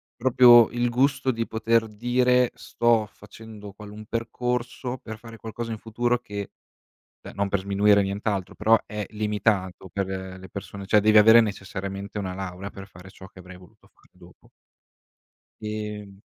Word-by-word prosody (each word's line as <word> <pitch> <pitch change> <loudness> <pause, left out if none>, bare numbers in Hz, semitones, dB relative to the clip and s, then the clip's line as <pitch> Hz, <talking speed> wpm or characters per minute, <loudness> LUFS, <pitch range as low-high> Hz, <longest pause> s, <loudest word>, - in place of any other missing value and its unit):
proprio 120 -2 +7
il 120 0 0
gusto 130 +2 +1
di 115 -1 -2
poter 115 0 +1
dire: 125 +3 +2
"Sto 115 -2 +1
facendo 105 0 -12
qualun 105 +1 -11
percorso 125 +2 -3
per 110 -2 -9
fare 115 0 -12
qualcosa 115 +1 -6
in 110 - -4
futuro 120 +3 -1
che" 100 -4 -7 0.7
cioè - - -11
non 100 0 -1
per 100 -1 0
sminuire 100 +1 +3
nient'altro, 100 -1 -3
però 110 +2 +4
è 105 -1 -5
limitato 105 -3 -1
per, 100 +1 -2
ehm, 95 -1 -6
le 95 0 -12
persone, 100 0 -8
cioè 105 +1 +4
devi 110 +1 +5
avere 110 +2 +8
necessariamente 100 -1 -5
una 95 -2 -4
laurea 95 0 -6
per 95 -1 -11
fare 90 -1 -14
ciò 95 - -13
che 95 - -17
avrei 90 0 -12
voluto 90 -2 -20
fare - - -28
dopo. - - -19 1.1
Ehm 105 -2 -6
105 Hz, 160 wpm, -25 LUFS, 100-115 Hz, 1.1 s, avere